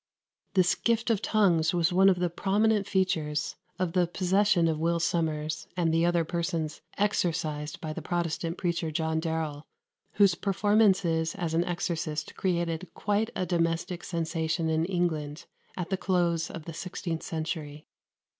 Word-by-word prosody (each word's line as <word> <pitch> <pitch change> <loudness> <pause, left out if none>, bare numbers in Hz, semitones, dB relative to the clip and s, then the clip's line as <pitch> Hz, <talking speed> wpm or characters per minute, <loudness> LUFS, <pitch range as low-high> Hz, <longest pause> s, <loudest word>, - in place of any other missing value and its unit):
This 185 -2 +4
gift 230 0 +1
of 215 - +1
tongues 175 -6 +3
was 170 0 +2
one 190 +2 +6
of 185 - +3
the 175 -1 0
prominent 205 +3 +2
features 165 -6 0 0.2
of 180 -2 -1
the 180 -2 +3
possession 185 0 +2
of 160 -1 0
Will 170 +1 +1
Sommers 155 -2 -1
and 165 -2 +2
the 165 +1 +3
other 170 -1 +2
persons 165 -2 -2 0.2
exorcised 165 -7 -1
by 155 -1 -4
the - - -6
Protestant 170 -1 -2
preacher 170 -2 -1
John 160 0 0
Darrell, 160 -3 -2 0.5
whose 200 -3 +5
performances 195 -4 +2
as 170 -4 -3
an 165 +1 +3
exorcist 165 -3 -3
created 170 -2 -1
quite 210 +2 0
a 185 - -1
domestic 170 +1 -1
sensation 160 -1 -1
in 160 +1 +1
England 165 -4 -2 0.3
at 180 0 -4
the 190 - +1
close 175 -3 +1
of 165 -2 -8
the 165 - -6
sixteenth 165 -1 -4
century. 155 -2 -4
170 Hz, 150 wpm, -28 LUFS, 160-185 Hz, 0.5 s, one